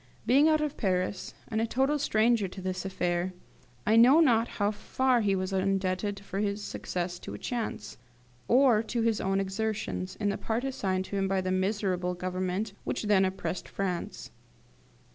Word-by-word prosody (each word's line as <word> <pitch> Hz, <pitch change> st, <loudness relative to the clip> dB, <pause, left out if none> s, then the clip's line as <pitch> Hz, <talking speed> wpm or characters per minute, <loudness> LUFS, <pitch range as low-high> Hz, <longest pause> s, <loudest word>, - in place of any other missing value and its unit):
Being 280 Hz, +5 st, +5 dB
out 310 Hz, -1 st, +3 dB
of 300 Hz, -2 st, -2 dB
Paris, 185 Hz, -2 st, -1 dB
and 220 Hz, 0 st, -1 dB
a 230 Hz, -, 0 dB
total 270 Hz, +5 st, +1 dB
stranger 225 Hz, -5 st, +2 dB
to 185 Hz, -, -9 dB
this 185 Hz, 0 st, -3 dB
affair, 180 Hz, -1 st, -1 dB, 0.5 s
I 220 Hz, -, +4 dB
know 255 Hz, +7 st, +7 dB
not 235 Hz, -7 st, +4 dB
how 205 Hz, 0 st, 0 dB
far 250 Hz, +3 st, +1 dB
he 200 Hz, -2 st, +2 dB
was 185 Hz, +1 st, -2 dB
indebted 195 Hz, +1 st, 0 dB
for 195 Hz, -1 st, -5 dB
his 205 Hz, 0 st, -1 dB
success 175 Hz, -2 st, -4 dB
to -, -, -7 dB
chance, 225 Hz, -, -4 dB, 0.5 s
or 245 Hz, -3 st, +5 dB
to 230 Hz, +1 st, -2 dB
his 225 Hz, -2 st, +1 dB
own 195 Hz, 0 st, +1 dB
exertions, 195 Hz, -1 st, -3 dB
in 205 Hz, -1 st, -1 dB
the 200 Hz, -, -2 dB
part 230 Hz, +2 st, -2 dB
assigned 190 Hz, -8 st, -1 dB
to 200 Hz, -, -4 dB
him 195 Hz, 0 st, +1 dB
by 195 Hz, 0 st, +1 dB
the 185 Hz, 0 st, -2 dB
miserable 185 Hz, -2 st, 0 dB
Government 185 Hz, +3 st, -2 dB
which -, -, -3 dB
then 205 Hz, -2 st, +4 dB
oppressed 185 Hz, 0 st, -4 dB
France. 180 Hz, -, -4 dB
200 Hz, 170 wpm, -29 LUFS, 185-225 Hz, 0.5 s, know